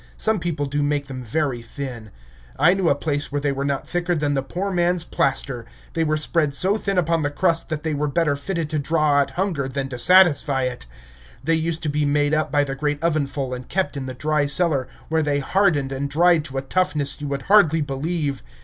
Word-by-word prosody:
Some 220 -2 +1
people 165 -4 -2
do 145 +1 -1
make 145 0 0
them 130 -2 -7
very 130 0 -1
thin. 120 -2 -7 0.5
I 160 +5 +5
knew 190 -3 +1
a - - +3
place 145 -1 -2
where 145 - -1
they 145 0 0
were 135 0 -3
not 140 -1 -2
thicker 175 0 -1
than 145 -2 0
the 135 - +1
poor 185 +9 -4
man's 175 -1 +1
plaster; 135 -6 -1 0.3
they 165 - +1
were 155 -1 +1
spread 155 -2 0
so 190 +7 +3
thin 200 -3 -2
upon 165 -1 +2
the 145 - 0
crust 165 +3 0
that 155 -2 -3
they 160 -1 -1
were 150 +1 -1
better 145 0 +1
fitted 165 +3 -3
to 155 - 0
draw 150 0 +2
out 140 - +1
hunger 175 -8 -1
than 135 0 -3
to 125 -2 -6
satisfy 150 -6 +4
it. 125 - -4 0.6
They 165 +4 +1
used 160 0 -1
to 155 - 0
be 150 +1 0
made 145 +1 +1
up 155 -2 0
by 145 0 +3
the 135 -1 -3
great 145 +1 -1
oven 155 -4 +1
full 135 -1 -4
and 125 0 -7
kept 190 -4 -1
in 135 -2 -4
the 130 - -6
dry 150 +1 0
cellar, 140 -3 +1 0.2
where 160 0 +2
they 145 -2 0
hardened 145 -2 +1
and 140 +1 -3
dried 165 +1 +3
to 135 -3 -6
a 135 - -2
toughness 150 -3 0
you 145 - -3
would 140 -1 -3
hardly 170 -6 +4
believe. 145 0 -2
150 Hz, 230 wpm, -22 LUFS, 140-165 Hz, 0.6 s, I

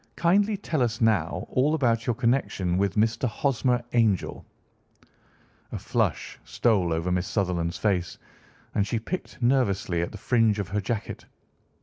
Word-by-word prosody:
Kindly 200 +5 +2
tell 155 -6 -2
us 115 -2 0
now 110 -3 +1
all 145 +5 +2
about 115 -6 +1
your 120 - +1
connection 115 -7 0
with 100 -1 0
Mr. 110 +4 +1
Hosmer 125 0 0
Angel." 110 -6 +1 1.3
A - - -4
flush - - -2
stole 100 -8 +1
over 80 +2 -1
Miss 90 +1 0
Sutherland's 90 -4 -1
face, 95 -5 -1 0.6
and 100 - +1
she 115 - -1
picked 180 +12 -5
nervously 100 -9 +1
at 85 - -3
the 105 - -8
fringe 115 0 +2
of 100 -2 -3
her 105 +1 -1
jacket. 105 +1 -4
110 Hz, 145 wpm, -26 LUFS, 95-125 Hz, 1.3 s, Kindly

